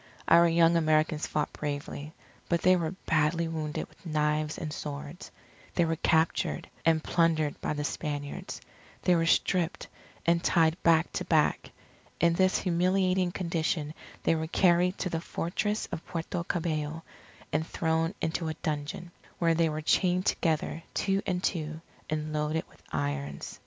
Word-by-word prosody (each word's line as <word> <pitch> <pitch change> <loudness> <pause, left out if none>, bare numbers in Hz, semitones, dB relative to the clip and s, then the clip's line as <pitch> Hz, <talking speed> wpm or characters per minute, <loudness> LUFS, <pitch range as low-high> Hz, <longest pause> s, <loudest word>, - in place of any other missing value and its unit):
Our 170 +1 +7
young 165 0 +4
Americans 155 -1 +2
fought 150 - -1
bravely, 145 0 -5 0.4
but 170 -1 +1
they 185 0 +6
were 170 0 -2
badly 165 +1 +2
wounded 155 -2 -3
with - - -24
knives 150 -1 0
and 155 -2 -4
swords. 145 +3 -6 0.5
They 175 - +3
were 165 0 0
captured, 160 +1 +1 0.2
and 160 -1 +3
plundered 160 -3 +1
by - - -1
the 150 0 -3
Spaniards. 145 -1 -4 0.4
They 180 - +4
were 165 0 +2
stripped, 180 +1 +1 0.4
and 170 +1 +3
tied 165 0 +3
back 165 0 +4
to - - -2
back. - - +2 0.5
In 170 0 +4
this 185 +2 +3
humiliating 185 +1 +2
condition 165 -4 -1 0.3
they - - +3
were 160 -1 -1
carried 180 +2 +3
to 185 - -2
the 165 - -1
Fortress 210 +6 -2
of 165 - -4
Puerto 170 +1 -3
Cabello, 160 -2 -2 0.5
and 155 +2 0
thrown 165 +2 0
into 165 0 -1
a 155 - -3
dungeon; 155 +2 -4 0.3
where 165 -1 +3
they 165 0 +2
were 155 0 -3
chained 180 +4 +2
together, 160 -1 0
two 195 0 +1
and 180 -1 -1
two, 155 -3 -2 0.3
and 155 0 -2
loaded 150 +1 -1
with - - -22
irons. 70 -1 -3
165 Hz, 150 wpm, -29 LUFS, 155-175 Hz, 0.5 s, Our